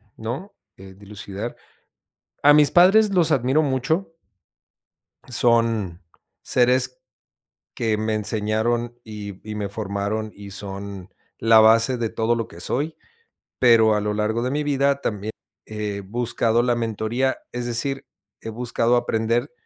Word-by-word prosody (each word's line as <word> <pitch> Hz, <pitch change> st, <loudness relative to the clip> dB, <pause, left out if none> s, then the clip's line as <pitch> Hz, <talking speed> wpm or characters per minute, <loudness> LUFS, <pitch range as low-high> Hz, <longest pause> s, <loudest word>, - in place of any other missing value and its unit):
¿no?, 130 Hz, -, -6 dB, 0.2 s
eh, 95 Hz, 0 st, -12 dB
dilucidar 100 Hz, +2 st, -7 dB, 0.9 s
a 145 Hz, -, +8 dB
mis 145 Hz, -1 st, +5 dB
padres 195 Hz, +5 st, +6 dB
los 175 Hz, -3 st, +3 dB
admiro 130 Hz, +5 st, +2 dB
mucho 155 Hz, +6 st, -1 dB, 1.2 s
son 115 Hz, -7 st, +1 dB, 0.4 s
seres 130 Hz, -, +2 dB, 0.7 s
que 110 Hz, -4 st, 0 dB
me 110 Hz, +1 st, -1 dB
enseñaron 110 Hz, +3 st, -1 dB
y 105 Hz, -3 st, -8 dB
y 105 Hz, -, -4 dB
me 105 Hz, -2 st, -3 dB
formaron 105 Hz, +1 st, -3 dB
y 100 Hz, -1 st, -11 dB
son 100 Hz, -1 st, -7 dB, 0.3 s
la 115 Hz, 0 st, +6 dB
base 115 Hz, +3 st, +5 dB
de 115 Hz, -2 st, -1 dB
todo 115 Hz, +2 st, 0 dB
lo 115 Hz, -1 st, -3 dB
que 85 Hz, -, -13 dB
soy, 145 Hz, -, -2 dB, 0.7 s
pero 115 Hz, -3 st, +5 dB
a 105 Hz, -, +1 dB
lo 105 Hz, 0 st, -2 dB
largo 110 Hz, +2 st, -1 dB
de 125 Hz, -, -1 dB
mi 150 Hz, +2 st, -1 dB
vida 140 Hz, -1 st, +1 dB
también 105 Hz, -4 st, -3 dB, 0.4 s
he 105 Hz, -2 st, -4 dB
buscado 115 Hz, +2 st, 0 dB
la 120 Hz, 0 st, +2 dB
mentoría, 115 Hz, +3 st, -1 dB
es 120 Hz, 0 st, -4 dB
decir, 135 Hz, +3 st, -1 dB, 0.3 s
he -, -, -8 dB
buscado 120 Hz, +1 st, 0 dB
aprender 115 Hz, +3 st, 0 dB
115 Hz, 135 wpm, -23 LUFS, 105-125 Hz, 1.2 s, a